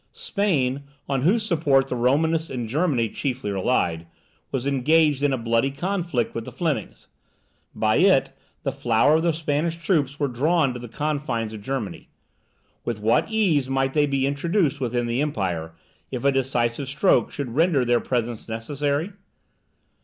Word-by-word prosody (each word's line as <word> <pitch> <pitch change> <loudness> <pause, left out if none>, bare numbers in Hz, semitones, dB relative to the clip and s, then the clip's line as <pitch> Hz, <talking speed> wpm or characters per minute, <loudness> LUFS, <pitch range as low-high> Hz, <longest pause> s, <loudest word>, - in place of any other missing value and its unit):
Spain, 190 - 0 0.3
on 135 -2 0
whose 210 - +2
support 145 -8 +2
the 125 - -3
Romanists 160 +7 +1
in 120 -3 -4
Germany 135 -3 +1
chiefly 130 -2 -3
relied, 90 -5 0 0.4
was 135 -1 -2
engaged 145 +2 +3
in 145 -1 +2
a 130 - 0
bloody 115 +2 +1
conflict 170 - -2
with 115 - -4
the - - -8
Flemings. 150 - -3 0.7
By - - +2
it, - - +4 0.3
the - - 0
flower 120 +7 +3
of - - 0
the 170 0 +2
Spanish 160 +1 -1
troops 150 -5 0
were 145 - +1
drawn 140 +3 +1
to 125 - -6
the 120 - -8
confines 140 -4 -2
of 110 - -8
Germany. 125 -2 -5 0.7
With 115 -3 -3
what 110 - +2
ease 175 -12 +1
might 135 0 0
they 150 -1 +3
be 135 -1 0
introduced 145 +2 0
within 120 -2 -1
the 120 +3 -1
empire, 90 - -2 0.4
if 130 0 -5
a 140 - +5
decisive 130 -1 0
stroke 150 +8 +2
should 135 -5 -5
render 155 -3 +3
their 120 0 +3
presence 120 -3 -3
necessary? 145 - -2
135 Hz, 160 wpm, -24 LUFS, 120-155 Hz, 0.7 s, a